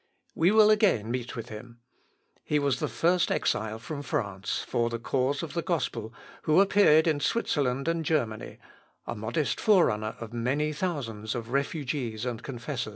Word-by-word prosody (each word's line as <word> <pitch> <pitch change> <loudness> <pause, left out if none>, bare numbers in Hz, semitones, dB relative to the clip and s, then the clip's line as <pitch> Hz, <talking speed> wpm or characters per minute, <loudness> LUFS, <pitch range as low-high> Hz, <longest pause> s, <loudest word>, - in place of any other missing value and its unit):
We 165 +3 +3
will 215 0 +6
again 190 - +3
meet 125 -1 -3
with 115 - -6
him. 115 +2 -10 0.7
He 150 - 0
was 140 -3 +1
the 150 - -1
first 170 +9 +1
exile 110 0 0
from 140 +6 -6
France, 100 -8 -3
for 120 0 0
the 115 - -3
cause 130 +5 -1
of 160 - -6
the 170 - -1
gospel, 150 - -2 0.3
who 155 +3 +3
appeared 195 -6 +5
in 155 -3 +2
Switzerland 140 - 0
and 165 0 0
Germany 125 -9 -1 0.5
a - - -3
modest 115 +8 -2
fore 205 -5 +5
runner 110 -1 -2
of 115 0 -8
many 135 +6 0
thousands 120 - -3
of 115 -1 -5
refugees 135 -5 -2
and 120 -2 -3
confessors. 125 -1 -4
135 Hz, 165 wpm, -28 LUFS, 115-160 Hz, 0.7 s, will